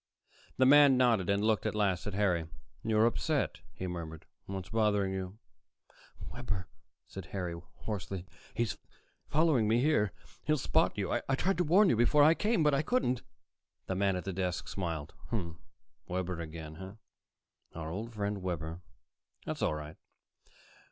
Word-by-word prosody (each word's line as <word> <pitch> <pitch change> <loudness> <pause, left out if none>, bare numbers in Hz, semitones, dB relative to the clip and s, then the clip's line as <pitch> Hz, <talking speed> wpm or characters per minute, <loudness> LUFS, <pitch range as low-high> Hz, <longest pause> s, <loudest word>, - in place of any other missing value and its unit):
The 130 - +5
man 140 -1 +7
nodded 115 -8 +3
and 100 +1 +2
looked 110 0 +2
at 105 - -2
last 100 -3 +1
at 100 - -3
Harry. 90 -6 +1 0.4
"You're 110 0 +3
upset," 115 - 0
he 95 - -6
murmured. 85 -3 -6 0.2
"What's 95 -1 -5
bothering 105 -3 +2
you?" 95 +1 -5 0.9
"Webber," 100 -7 -4 0.4
said 95 -3 -8
Harry 90 -3 -3 0.3
hoarsely. 95 -3 -4 0.3
"He's 115 -4 -1 0.5
following 150 -7 +3
me 115 +2 +3
here. 125 -8 +3 0.3
He'll 155 0 +2
spot - - +2
you. - - -1
I 135 - 0
tried 180 +5 0
to - - +4
warn 185 +6 +5
you - - +4
before 120 +6 +5
I 155 +2 +7
came, 210 -1 +1
but 150 -1 +4
I 140 - +3
couldn't." 155 - +1 0.6
The - - -2
man 95 0 +2
at 90 - -3
the 95 - -3
desk 90 -1 -2
smiled. 80 -5 -4 0.9
"Webber 90 -1 -2
again, 80 -1 -7
eh? 95 +1 -7 0.9
Our 80 -1 -4
old 110 +6 -4
friend 105 -2 -2
Webber. 85 -2 -4 0.6
That's - - -4
all 75 - +1
right. 75 +1 -7
100 Hz, 155 wpm, -32 LUFS, 90-125 Hz, 0.9 s, man